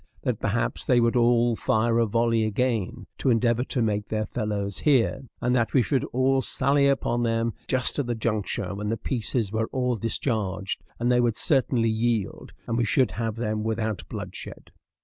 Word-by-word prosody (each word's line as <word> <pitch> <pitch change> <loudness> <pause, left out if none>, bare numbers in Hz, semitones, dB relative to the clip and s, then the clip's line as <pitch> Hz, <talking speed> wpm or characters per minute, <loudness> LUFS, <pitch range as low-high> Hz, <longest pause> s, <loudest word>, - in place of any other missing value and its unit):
that - - -1
perhaps - - -1
they 125 - +3
would 115 0 +2
all 120 -1 +3
fire 115 +2 +1
a 115 - +3
volley 115 +1 +2
again, 110 -2 -1
to - - +1
endeavor 120 0 +2
to 125 -2 -1
make 105 -1 -1
their 110 -1 -1
fellows 100 -3 -3
hear, 135 -3 +2 0.2
and 125 +1 +1
that 120 -2 +1
we 130 - +6
should 135 -1 0
all 130 +1 +1
sally 140 +2 +2
upon 125 -3 +1
them 115 -1 0
just 130 +2 +1
at 140 - -1
the 120 - -1
juncture 105 -4 -2
when 105 +1 -4
their 115 +2 -1
pieces 115 -2 -2
were 110 0 -1
all 125 -2 -1
discharged, 105 -4 -2 0.2
and 120 +1 +1
they 125 0 +4
would 120 -2 +1
certainly 130 -5 +2
yield, 110 -2 -1 0.2
and 115 +1 0
we - - +2
should 130 - +2
have 110 +2 -3
them 110 -2 -2
without 110 -2 -2
bloodshed. - - -8
115 Hz, 185 wpm, -25 LUFS, 110-125 Hz, 0.2 s, we